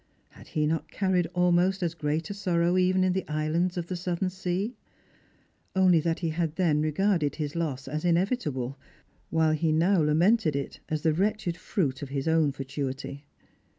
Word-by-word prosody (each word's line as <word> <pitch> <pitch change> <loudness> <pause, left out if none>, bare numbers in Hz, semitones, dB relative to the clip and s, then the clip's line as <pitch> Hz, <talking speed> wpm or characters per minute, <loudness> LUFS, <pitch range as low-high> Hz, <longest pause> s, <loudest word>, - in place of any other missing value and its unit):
Had - - -16
he 155 -1 0
not 160 +1 -1
carried 185 -3 +1
almost 180 +2 +3
as 170 -2 0
great 155 +2 -2
a - - -2
sorrow 175 -3 +1
even 185 0 +3
in 185 -1 +2
the 190 - -2
islands 155 +4 0
of 175 - -2
the 185 - -4
southern 180 +1 -2
sea? 185 +4 -2 1.0
only 185 -3 +5
that 165 +2 -1
he 165 - 0
had 160 -1 -2
then 160 -5 +2
regarded 155 0 +1
his 150 -1 -4
loss 145 -6 -3
as 150 +3 -3
inevitable, 165 - 0 0.5
while 160 -1 +2
he 155 0 +1
now 170 +4 +3
lamented 160 +3 +3
it 140 -1 -4
as 155 -1 -2
the 160 - +3
wretched 200 0 0
fruit 150 - -2
of 140 - -6
hia 135 0 -2
ftwn 160 -2 +2
fatuity. 135 +1 -5
165 Hz, 175 wpm, -27 LUFS, 150-185 Hz, 1.0 s, only